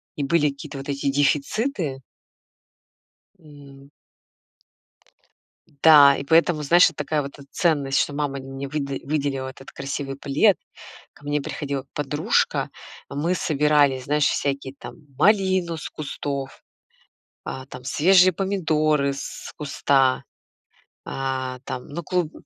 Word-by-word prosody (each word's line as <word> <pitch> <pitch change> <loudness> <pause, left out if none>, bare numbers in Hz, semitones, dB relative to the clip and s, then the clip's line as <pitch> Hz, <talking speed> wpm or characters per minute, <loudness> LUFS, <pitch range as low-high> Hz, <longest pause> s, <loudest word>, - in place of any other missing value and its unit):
и 145 - -3
были 150 +1 +2
какие-то 140 +1 -8
вот 135 +1 -8
эти 140 0 -1
дефициты. 145 - 0 1.4
М. 140 -3 -15 1.9
Да, 145 -3 +8
и - - -4
поэтому, 165 +1 +3
знаешь, 175 +5 +6
это 165 - -16
такая 150 0 -1
вот, 140 +1 -8
э, - - -11
ценность, 145 -7 +1
что 145 - 0
мама 145 -2 -2
мне 135 +1 -7
выда 140 -2 -3
выделила 140 -2 -2
этот 135 0 -13
красивый 135 0 -5
плед, 150 +9 +3 0.6
ко - - -21
мне 145 0 0
приходила 140 -1 -4
подружка, 150 +1 0 0.4
а - - -9
мы 160 +5 0
собирали, 150 -5 +2
знаешь, 145 +2 +1
всякие 140 -2 -1
там - - -10 0.2
малину 190 -5 +2
с - - -6
кустов, 140 -2 -5 0.8
а, 130 - -6
там, 125 -2 -11
свежие 185 +7 +5
помидоры 155 -6 +1
с 140 - -7
куста, 135 -2 +1 0.8
а, 130 -1 -3
там, 130 -2 -6
ну, 170 +4 -5
клуб 175 -2 -1
145 Hz, 125 wpm, -23 LUFS, 135-155 Hz, 1.9 s, Да